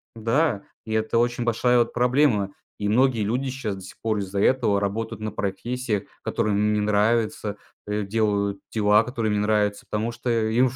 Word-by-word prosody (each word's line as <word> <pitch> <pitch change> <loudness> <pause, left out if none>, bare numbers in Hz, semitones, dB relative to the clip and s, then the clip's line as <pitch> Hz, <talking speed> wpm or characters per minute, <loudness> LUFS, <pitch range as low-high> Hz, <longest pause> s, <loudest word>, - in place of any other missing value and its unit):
да, 115 0 +1 0.2
и 110 - -4
это 110 +1 +1
очень 120 +1 +1
большая 120 +1 +3
вот 120 - +1
проблема, 120 -5 +2 0.2
и 105 - -2
многие 120 +1 +3
люди 125 +6 -1
щас 125 -6 -3
до 95 - -10
сих 95 - -12
пор 110 -2 0
из-за 100 0 -3
этого 115 -2 +3
работают 105 +2 -3
на 110 0 -3
профессиях, 110 +2 -2 0.2
которые 110 -3 0
им 105 +1 +2
не 105 - +1
нравятся, 105 0 +1 0.3
э, 105 0 -1
делают 100 -1 0
дела 105 0 +4
которые 115 -3 -2
не 105 - +1
нравятся 105 -1 +1
потому 110 +2 -1
что 120 +1 -5
им 115 +2 +2
в 125 - -10
110 Hz, 185 wpm, -24 LUFS, 105-120 Hz, 0.3 s, дела